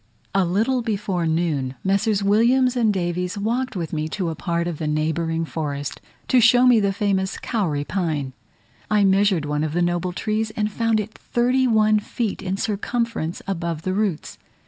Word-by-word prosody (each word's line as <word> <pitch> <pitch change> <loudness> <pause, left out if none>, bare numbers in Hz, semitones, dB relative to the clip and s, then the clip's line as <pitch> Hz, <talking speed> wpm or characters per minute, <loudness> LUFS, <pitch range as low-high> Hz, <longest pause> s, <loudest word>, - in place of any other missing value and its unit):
A 195 - +3
little 225 +9 +1
before 200 -6 -1
noon 155 -6 -1
Messrs. 200 +1 +1
Williams 240 +5 +3
and 230 -3 +3
Davies 180 0 -2
walked 235 +4 -1
with 170 -3 -4
me 155 0 -2
to 180 +1 -2
a 160 - -4
part 170 +1 -1
of 165 -3 -5
a 155 - -1
neighbouring 160 +2 -1
forest, 145 -3 -4 0.3
to 255 - +4
show 245 +2 +6
me 245 -3 +6
the 200 -1 +1
famous 195 -2 -1
kauri 165 -11 -1
pine. 150 -7 -2 0.6
I 210 -1 +3
measured 195 -4 +3
one 150 0 -1
of 155 -1 -2
the 175 - +1
noble 175 +1 0
trees, 215 +4 -1
and 210 0 -1
found 225 0 +1
it 215 +1 -5
thirty 250 +2 +1
one 215 -2 +4
feet 215 0 -3
in 190 0 -2
circumference 215 -4 -2
above 170 -4 -3
the 185 - -1
roots. 200 -5 -2
195 Hz, 175 wpm, -22 LUFS, 165-220 Hz, 0.6 s, show